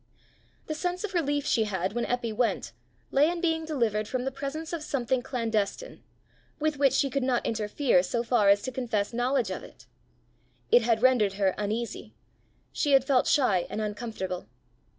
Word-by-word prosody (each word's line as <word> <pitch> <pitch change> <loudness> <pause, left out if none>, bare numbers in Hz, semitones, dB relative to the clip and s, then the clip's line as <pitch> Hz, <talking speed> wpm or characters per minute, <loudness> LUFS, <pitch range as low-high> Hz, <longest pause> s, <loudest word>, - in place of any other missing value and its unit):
The 310 - -3
sense 360 +4 -3
of 410 -2 -4
relief 290 -4 0
she 225 -6 +2
had 190 -2 -2
when 240 0 -1
Eppy 240 -2 -1
went, 235 +2 -1 0.4
lay 290 +3 +4
in 345 0 -3
being 325 -2 0
delivered 230 -9 0
from 255 +1 -2
the 270 - -1
presence 280 +5 -5
of 335 - -3
something 260 -4 -1
clandestine, 230 - -2 0.6
with 305 -1 0
which 275 -2 +4
she 280 - +2
could 275 +1 -1
not 255 -2 0
interfere 220 0 +2
so 235 +6 -2
far 230 -4 +3
as 200 0 +4
to 260 - -3
confess 235 -5 -2
knowledge 245 +1 0
of - - -5
it. - - -15 0.9
It 240 - +7
had 230 0 +1
rendered 240 -6 +4
her 195 -1 +1
uneasy; 220 +3 -4 0.6
she 290 -2 0
had 270 -1 +5
felt 270 -2 +3
shy 205 -11 +2
and - - -4
uncomfortable. 210 - -4
245 Hz, 175 wpm, -28 LUFS, 215-280 Hz, 0.9 s, It